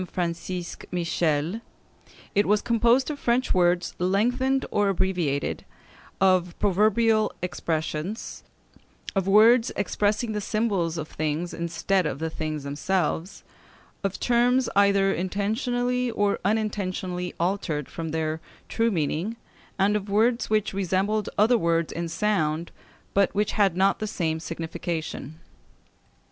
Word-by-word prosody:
Francisque 175 Hz, 0 st, -4 dB
Michel, 170 Hz, +2 st, 0 dB, 0.7 s
it 205 Hz, -, +2 dB
was 210 Hz, +1 st, +3 dB
composed 235 Hz, +4 st, +3 dB
of 290 Hz, -, -6 dB
French 245 Hz, +2 st, +1 dB
words 175 Hz, -1 st, +2 dB
lengthened 245 Hz, +9 st, +1 dB
or 205 Hz, -1 st, +2 dB
abbreviated; 180 Hz, -7 st, -1 dB, 0.6 s
of 185 Hz, -2 st, +2 dB
proverbial 215 Hz, +3 st, +3 dB
expressions; 165 Hz, +3 st, -3 dB, 0.7 s
of 195 Hz, -1 st, 0 dB
words 225 Hz, +4 st, +6 dB
expressing 210 Hz, +3 st, 0 dB
the 210 Hz, -1 st, -2 dB
symbols 195 Hz, -6 st, 0 dB
of 155 Hz, -1 st, -4 dB
things 155 Hz, +3 st, -3 dB
instead 170 Hz, +2 st, 0 dB
of -, -, -3 dB
the 160 Hz, +2 st, -3 dB
things 155 Hz, -2 st, -4 dB
themselves; 170 Hz, +5 st, -2 dB, 0.6 s
of 195 Hz, -1 st, -2 dB
terms 245 Hz, +1 st, +3 dB
either 200 Hz, -1 st, +4 dB
intentionally 245 Hz, +7 st, -1 dB
or 205 Hz, -3 st, 0 dB
unintentionally 185 Hz, -4 st, -2 dB
altered 170 Hz, -5 st, -1 dB
from 165 Hz, -1 st, -5 dB
their 160 Hz, 0 st, -2 dB, 0.3 s
true 230 Hz, 0 st, +1 dB
meaning; 170 Hz, +3 st, -1 dB, 0.4 s
and 200 Hz, +1 st, +3 dB
of 205 Hz, -1 st, -3 dB
words 230 Hz, +4 st, +2 dB
which 215 Hz, -2 st, +1 dB
resembled 195 Hz, +3 st, 0 dB
other 225 Hz, +3 st, +4 dB
words 165 Hz, -1 st, +1 dB
in 170 Hz, 0 st, -3 dB
sound, 165 Hz, -4 st, 0 dB, 0.4 s
but 200 Hz, 0 st, +2 dB
which 210 Hz, +1 st, +1 dB
had 195 Hz, -5 st, +2 dB
not 195 Hz, +1 st, +3 dB
the 215 Hz, -, -2 dB
same 160 Hz, -6 st, -1 dB
signification. 165 Hz, -2 st, -5 dB
195 Hz, 120 wpm, -25 LUFS, 170-215 Hz, 0.7 s, words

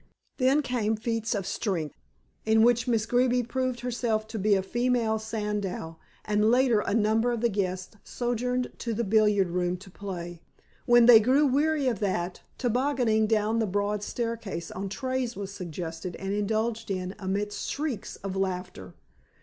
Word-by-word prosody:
Then 270 Hz, +3 st, +3 dB
came 225 Hz, -4 st, 0 dB
feats 225 Hz, +1 st, -2 dB
of 195 Hz, -2 st, -2 dB
strength, 180 Hz, -7 st, -2 dB, 0.5 s
in 220 Hz, 0 st, +4 dB
which 240 Hz, 0 st, +3 dB
Miss 225 Hz, -3 st, +1 dB
Greeby 245 Hz, +1 st, +2 dB
proved 255 Hz, 0 st, -2 dB
herself 235 Hz, -3 st, -1 dB
to 220 Hz, -1 st, -4 dB
be 205 Hz, +1 st, +3 dB
a 190 Hz, -, 0 dB
female 240 Hz, 0 st, +1 dB
Sandow, 210 Hz, -6 st, -4 dB, 0.3 s
and 210 Hz, +1 st, +2 dB
later 245 Hz, -2 st, +4 dB
a 210 Hz, -, -1 dB
number 225 Hz, +2 st, +2 dB
of 235 Hz, -2 st, -2 dB
the 235 Hz, -, +3 dB
guests 185 Hz, -1 st, -3 dB
sojourned 250 Hz, +1 st, -2 dB
to 230 Hz, -2 st, -3 dB
the 235 Hz, -, 0 dB
billiard 210 Hz, -3 st, +3 dB
room 180 Hz, +1 st, -1 dB
to 190 Hz, +1 st, -14 dB
play. 175 Hz, -4 st, -7 dB, 0.5 s
When 240 Hz, -1 st, +7 dB
they 235 Hz, -2 st, +10 dB
grew 260 Hz, +7 st, +3 dB
weary 290 Hz, +1 st, +2 dB
of 230 Hz, -6 st, 0 dB
that, 185 Hz, -3 st, -2 dB, 0.2 s
tobogganing 245 Hz, -3 st, +1 dB
down 220 Hz, +1 st, +1 dB
the 220 Hz, -, +1 dB
broad 205 Hz, +2 st, -1 dB
staircase 225 Hz, -6 st, -4 dB
on 195 Hz, +1 st, -4 dB
trays 255 Hz, +2 st, -2 dB
was 200 Hz, -1 st, -5 dB
suggested 175 Hz, -1 st, -6 dB
and 195 Hz, +1 st, -4 dB
indulged 220 Hz, +2 st, -1 dB
in 185 Hz, -1 st, -3 dB
amidst 205 Hz, +2 st, -2 dB
shrieks 280 Hz, -8 st, -3 dB
of 195 Hz, -1 st, -4 dB
laughter. 180 Hz, -, -4 dB
220 Hz, 160 wpm, -27 LUFS, 195-240 Hz, 0.5 s, they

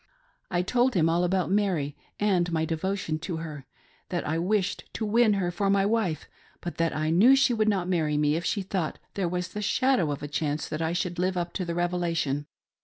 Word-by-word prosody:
I 175 Hz, 0 st, 0 dB
told 245 Hz, +5 st, +2 dB
him 165 Hz, -2 st, +3 dB
all 170 Hz, +2 st, +2 dB
about 185 Hz, 0 st, +1 dB
Mary, 180 Hz, -9 st, +1 dB, 0.2 s
and 185 Hz, -4 st, +2 dB
my 160 Hz, -1 st, +1 dB
devo 180 Hz, +5 st, -1 dB
tion 155 Hz, -4 st, -3 dB
to 170 Hz, 0 st, -4 dB
her; 150 Hz, -4 st, -7 dB, 0.4 s
that 175 Hz, -, -2 dB
I 160 Hz, +2 st, 0 dB
wished 200 Hz, +2 st, 0 dB
to 220 Hz, -, -2 dB
win 220 Hz, +1 st, +4 dB
her 185 Hz, -3 st, 0 dB
for 195 Hz, +3 st, 0 dB
my 195 Hz, 0 st, +3 dB
wife, 205 Hz, -7 st, 0 dB, 0.3 s
but 175 Hz, -, -6 dB
that 165 Hz, 0 st, 0 dB
I 155 Hz, +1 st, 0 dB
knew 220 Hz, +11 st, +7 dB
she 270 Hz, -2 st, +3 dB
would 215 Hz, -1 st, +2 dB
not 190 Hz, -4 st, 0 dB
marry 160 Hz, -5 st, +1 dB
me 150 Hz, 0 st, +2 dB
if 170 Hz, -, -2 dB
she 200 Hz, +3 st, -1 dB
thought 185 Hz, -4 st, -2 dB, 0.2 s
there 190 Hz, -4 st, -1 dB
was 180 Hz, 0 st, -2 dB
the 210 Hz, -, -5 dB
shadow 255 Hz, -, +2 dB
of 145 Hz, -, -5 dB
a -, -, -3 dB
chance 150 Hz, 0 st, -2 dB
that 155 Hz, -, -3 dB
I 165 Hz, +1 st, 0 dB
should 175 Hz, 0 st, -2 dB
live 185 Hz, +1 st, 0 dB
up 175 Hz, 0 st, -2 dB
to 185 Hz, -, -2 dB
the 170 Hz, -1 st, -3 dB
Revelation. 170 Hz, -5 st, -1 dB
175 Hz, 225 wpm, -27 LUFS, 160-200 Hz, 0.4 s, knew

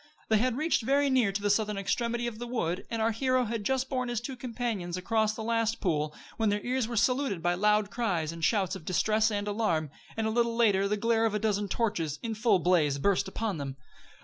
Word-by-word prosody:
They 220 Hz, -1 st, +4 dB
had 250 Hz, +1 st, +1 dB
reached 310 Hz, -2 st, +1 dB
very 275 Hz, +4 st, +2 dB
near 245 Hz, -6 st, +3 dB
to 200 Hz, +1 st, -3 dB
the 205 Hz, -, +3 dB
southern 210 Hz, 0 st, +1 dB
extremity 235 Hz, +4 st, -1 dB
of 230 Hz, -2 st, -4 dB
the 240 Hz, -, -5 dB
wood, 185 Hz, -8 st, -2 dB
and 230 Hz, -1 st, -1 dB
our 225 Hz, -, +2 dB
hero 255 Hz, +3 st, +1 dB
had 225 Hz, -1 st, -3 dB
just 265 Hz, +3 st, 0 dB
borne 255 Hz, -2 st, -2 dB
his 240 Hz, -2 st, -1 dB
two 260 Hz, +3 st, -6 dB
companions 230 Hz, -8 st, -3 dB
across 215 Hz, +3 st, +1 dB
the 220 Hz, -, -5 dB
last 230 Hz, 0 st, 0 dB
pool, 155 Hz, -5 st, -1 dB, 0.2 s
when 225 Hz, -2 st, +2 dB
their 205 Hz, 0 st, +1 dB
ears 250 Hz, -1 st, 0 dB
were 235 Hz, -1 st, -4 dB
saluted 250 Hz, -5 st, +1 dB
by 175 Hz, 0 st, +2 dB
loud 210 Hz, +2 st, +2 dB
cries 175 Hz, -10 st, -1 dB
and 165 Hz, 0 st, -8 dB
shouts 195 Hz, -1 st, +1 dB
of 190 Hz, -, -9 dB
distress 215 Hz, +5 st, +2 dB
and 205 Hz, -1 st, -2 dB
alarm, 170 Hz, -9 st, 0 dB, 0.3 s
and 220 Hz, -, 0 dB
a 220 Hz, -, 0 dB
little 235 Hz, 0 st, +1 dB
later 205 Hz, -4 st, +3 dB
the 210 Hz, +1 st, 0 dB
glare 225 Hz, +1 st, +2 dB
of 215 Hz, -, -2 dB
a -, -, +1 dB
dozen 205 Hz, -1 st, 0 dB
torches, 180 Hz, -9 st, -1 dB
in 230 Hz, -1 st, -2 dB
full 220 Hz, -1 st, +3 dB
blaze, 165 Hz, -5 st, +2 dB
burst 195 Hz, +6 st, +1 dB
upon 200 Hz, -3 st, -3 dB
them. 135 Hz, -2 st, -5 dB
220 Hz, 230 wpm, -29 LUFS, 195-235 Hz, 0.3 s, They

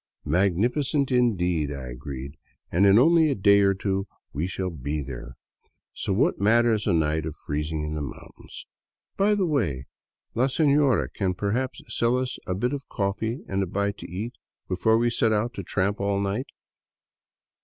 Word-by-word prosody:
" -, -, -44 dB
Magnificent, 120 Hz, -, +1 dB
indeed," 90 Hz, -, +1 dB
I 65 Hz, -3 st, -6 dB
agreed, 70 Hz, +2 st, -7 dB, 0.2 s
" -, -, -46 dB
and 95 Hz, +4 st, +4 dB
in 100 Hz, +1 st, +7 dB
only 160 Hz, +4 st, +5 dB
a 140 Hz, -, +1 dB
day 100 Hz, +1 st, +5 dB
or 100 Hz, -1 st, +3 dB
two 95 Hz, 0 st, -2 dB, 0.3 s
we 75 Hz, +5 st, -1 dB
shall 95 Hz, 0 st, -3 dB
be 75 Hz, 0 st, -3 dB
there. 65 Hz, -2 st, -8 dB, 0.6 s
So -, -, -3 dB
what -, -, +1 dB
matters 110 Hz, 0 st, +3 dB
a 100 Hz, -, +3 dB
night 80 Hz, -1 st, +1 dB
of 80 Hz, -, -6 dB
freezing 75 Hz, +1 st, -3 dB
in 75 Hz, -, -4 dB
the 75 Hz, -, -3 dB
mountains? 65 Hz, -3 st, -9 dB, 0.5 s
By 205 Hz, +2 st, +3 dB
the 195 Hz, -2 st, +1 dB
v^^ay, 100 Hz, -, 0 dB, 0.5 s
la 125 Hz, -, +2 dB
sefiora 140 Hz, -2 st, +3 dB
can 95 Hz, -3 st, -1 dB
perhaps 115 Hz, +7 st, -2 dB
sell 120 Hz, +2 st, +1 dB
us 130 Hz, 0 st, -3 dB
a 90 Hz, -, -1 dB
bit 125 Hz, +8 st, -1 dB
of 140 Hz, -1 st, -6 dB
coffee 110 Hz, +5 st, -2 dB
and 95 Hz, 0 st, -1 dB
a 95 Hz, -, -1 dB
bite 100 Hz, +2 st, -2 dB
to -, -, -8 dB
eat 105 Hz, +8 st, -5 dB, 0.3 s
before 105 Hz, +5 st, +2 dB
we 120 Hz, +1 st, +2 dB
set 115 Hz, -1 st, +2 dB
out 110 Hz, +3 st, 0 dB
to -, -, -5 dB
tramp 100 Hz, +2 st, -1 dB
all 100 Hz, 0 st, +1 dB
night? 100 Hz, +7 st, -2 dB
100 Hz, 180 wpm, -25 LUFS, 80-120 Hz, 0.6 s, in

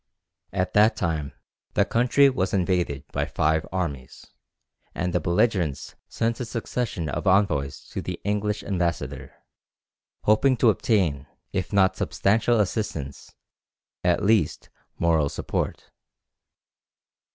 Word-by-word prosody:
At 90 Hz, 0 st, -1 dB
that 105 Hz, +2 st, +5 dB
time 80 Hz, -5 st, -2 dB, 0.4 s
the -, -, +4 dB
country 125 Hz, +4 st, +4 dB
was 100 Hz, -8 st, 0 dB
invaded 90 Hz, -7 st, 0 dB
by 70 Hz, +1 st, -1 dB
five 80 Hz, +3 st, 0 dB
armies, 75 Hz, -9 st, -4 dB, 0.7 s
and 90 Hz, -1 st, -2 dB
the 90 Hz, -, +2 dB
belligerents 85 Hz, -, 0 dB, 0.2 s
sent 115 Hz, 0 st, -1 dB
a 125 Hz, -, -3 dB
succession 115 Hz, -6 st, -3 dB
of 70 Hz, -, -3 dB
envoys 95 Hz, -8 st, +2 dB
to -, -, -4 dB
the -, -, -5 dB
English 105 Hz, +1 st, -1 dB
ambassador, 90 Hz, -5 st, -3 dB, 0.9 s
hoping 125 Hz, +5 st, +3 dB
to 115 Hz, -1 st, +5 dB
obtain, 85 Hz, -, 0 dB, 0.3 s
if 90 Hz, -1 st, -2 dB
not 100 Hz, -1 st, +3 dB
substantial 105 Hz, +7 st, +2 dB
assistance, 90 Hz, -, -3 dB, 0.7 s
at 90 Hz, -1 st, +2 dB
least 105 Hz, -5 st, +1 dB, 0.3 s
moral 80 Hz, -4 st, +2 dB
support. -, -, -4 dB
95 Hz, 115 wpm, -25 LUFS, 80-105 Hz, 0.9 s, that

